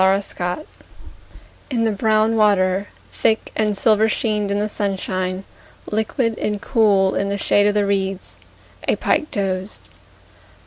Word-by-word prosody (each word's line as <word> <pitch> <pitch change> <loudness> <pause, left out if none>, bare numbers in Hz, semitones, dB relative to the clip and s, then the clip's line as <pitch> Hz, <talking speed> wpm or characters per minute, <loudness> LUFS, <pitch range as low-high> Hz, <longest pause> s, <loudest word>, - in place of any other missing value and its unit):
The 195 +1 +1
Pike 180 - -3 1.0
In 240 -4 0
the 225 - +2
brown 215 +2 +2
water, 200 -2 +2 0.3
Thick 220 - 0
and 210 -2 0
silver 220 +1 +3
sheened 210 -2 0
in 200 - 0
the 210 +1 0
sunshine, 190 -2 -2 0.5
Liquid 220 +2 -1
and 210 -1 -1
cool 200 -5 +3
in 200 - -1
the 200 - -1
shade 205 +1 +3
of 205 - +1
the 205 -1 +2
reeds, 195 -1 -2 0.5
A - - +3
pike 305 - 0
dozed. 190 0 -3
205 Hz, 140 wpm, -20 LUFS, 195-220 Hz, 1.0 s, silver